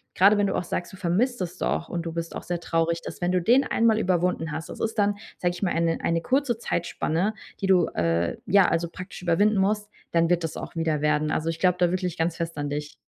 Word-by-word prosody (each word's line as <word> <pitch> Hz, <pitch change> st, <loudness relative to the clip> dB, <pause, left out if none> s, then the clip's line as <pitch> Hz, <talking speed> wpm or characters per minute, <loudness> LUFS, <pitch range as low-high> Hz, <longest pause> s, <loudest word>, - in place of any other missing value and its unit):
grade 200 Hz, +3 st, +6 dB
wenn 205 Hz, -1 st, +2 dB
du -, -, -1 dB
auch -, -, 0 dB
sagst: 175 Hz, -, -3 dB
„Du 190 Hz, -, -11 dB
vermisst 225 Hz, +9 st, 0 dB
es 180 Hz, -1 st, -4 dB
doch 165 Hz, -, -1 dB
und 175 Hz, -, -3 dB
du 165 Hz, -, -3 dB
bist 165 Hz, 0 st, -5 dB
auch -, -, -5 dB
sehr 175 Hz, -1 st, -3 dB
traurig“, 165 Hz, 0 st, 0 dB
dass -, -, -7 dB
wenn 175 Hz, +1 st, +1 dB
du 180 Hz, -, +2 dB
den 245 Hz, +9 st, +4 dB
einmal 225 Hz, -4 st, +2 dB
überwunden 180 Hz, -4 st, 0 dB
hast 160 Hz, +2 st, -5 dB
das -, -, -8 dB
ist 225 Hz, 0 st, -2 dB
dann, 205 Hz, 0 st, +3 dB, 0.2 s
sage 175 Hz, -1 st, 0 dB
ich 175 Hz, -, -9 dB
mal, 185 Hz, -, +1 dB
eine 165 Hz, 0 st, +1 dB
eine 165 Hz, 0 st, +1 dB
kurze 260 Hz, -1 st, +1 dB
Zeitspanne, 175 Hz, 0 st, -1 dB, 0.3 s
die 195 Hz, -, 0 dB
du, 180 Hz, -3 st, +5 dB
äh, 85 Hz, 0 st, +1 dB
ja, 200 Hz, -2 st, +5 dB
also, 165 Hz, 0 st, 0 dB
praktisch 185 Hz, +1 st, -9 dB
überwinden 195 Hz, +5 st, +3 dB
musst, 210 Hz, +2 st, +1 dB, 0.2 s
dann 165 Hz, 0 st, +3 dB
wird 175 Hz, -1 st, +2 dB
das 160 Hz, -, -4 dB
auch -, -, -7 dB
wieder 160 Hz, -2 st, 0 dB
werden. 150 Hz, 0 st, +1 dB
Also, 160 Hz, -, -1 dB
ich 165 Hz, 0 st, -3 dB
glaube 180 Hz, -1 st, +3 dB
da 175 Hz, -1 st, +3 dB
wirklich 180 Hz, -2 st, -2 dB
ganz 165 Hz, 0 st, 0 dB
fest 165 Hz, -2 st, -4 dB
an 145 Hz, 0 st, -2 dB
dich. 150 Hz, +1 st, -4 dB
175 Hz, 250 wpm, -25 LUFS, 165-195 Hz, 0.3 s, grade